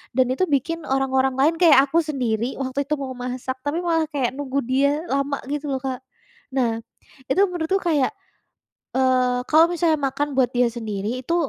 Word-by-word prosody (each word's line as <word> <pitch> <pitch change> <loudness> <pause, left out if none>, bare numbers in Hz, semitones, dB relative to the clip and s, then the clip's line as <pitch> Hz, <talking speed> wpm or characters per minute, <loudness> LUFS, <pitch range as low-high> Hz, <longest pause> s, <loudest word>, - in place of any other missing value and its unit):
Dan 260 - +4
itu 370 - 0
bikin 300 +4 0
orang-orang 265 -1 +1
lain 310 +4 +4
kayak 315 -6 +7
aku 335 - +3
sendiri 250 -5 -2
waktu 265 +1 -3
itu 300 +1 0
mau 260 -1 -4
masak 255 +1 -4
tapi 290 +3 -1
malah 325 -2 +2
kayak 260 -4 0
nunggu 280 -1 -2
dia 275 +2 +3 0.2
lama 275 +1 0
gitu 295 0 -3
loh, 265 - 0
Kak. 260 -1 -3 0.6
Nah, 230 -4 +1 0.5
itu 375 +9 +3
menurutku 355 +2 -1
kayak, 310 -4 +1 0.9
eee, 255 -1 +2
kalau 320 +2 +6
misalnya 330 -3 +2
makan 290 +2 -2
buat 255 -3 +3
dia 245 0 +3
sendiri 215 -4 -4
itu 335 +6 -1
270 Hz, 170 wpm, -22 LUFS, 255-305 Hz, 0.9 s, kayak